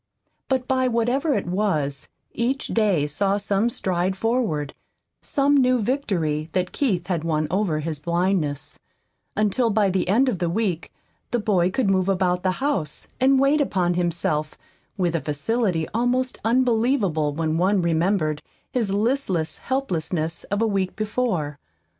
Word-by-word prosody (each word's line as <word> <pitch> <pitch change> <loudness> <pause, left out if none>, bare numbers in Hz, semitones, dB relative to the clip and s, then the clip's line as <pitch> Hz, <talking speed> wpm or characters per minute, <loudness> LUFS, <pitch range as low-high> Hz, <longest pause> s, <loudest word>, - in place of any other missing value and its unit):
But 260 -2 0
by 260 -1 +2
whatever 250 +5 +1
it - - -1
was, 175 -7 -1 0.2
each 255 +4 -1
day 200 -10 +2
saw 195 +7 0
some 200 +2 +1
stride 185 -3 -1
forward, 210 - -1 0.5
some 285 -1 +2
new 255 -2 +4
victory 180 - -1
that 180 -1 0
Keith 195 - 0
had 175 -4 -2
won 155 -2 0
over 185 -5 0
his 155 -1 -4
blindness, 170 -3 -1 0.6
until 215 +3 +1
by 205 -2 +2
the 185 -1 0
end 235 +8 +3
of 215 -9 0
the 175 -2 0
week 180 -3 -1 0.4
the 240 - 0
boy 195 -5 +2
could 200 +1 +1
move 190 0 +1
about 180 -2 +1
the 185 0 +1
house 265 - -2
and 265 +1 +4
wait 280 +3 +3
upon 180 -10 +1
himself 170 -3 -1 0.4
with 175 -3 0
a 165 - 0
facility 165 +3 -1
almost 250 +2 0
unbelievable 225 - +2
when 160 +1 -1
one 195 +3 +3
remembered 165 -2 +1 0.3
his 225 -6 0
listless 200 - 0
helplessness 170 - -2
of 205 +2 -1
a - - +3
week 195 -3 -1
before. 210 - -2
195 Hz, 145 wpm, -23 LUFS, 165-240 Hz, 0.6 s, new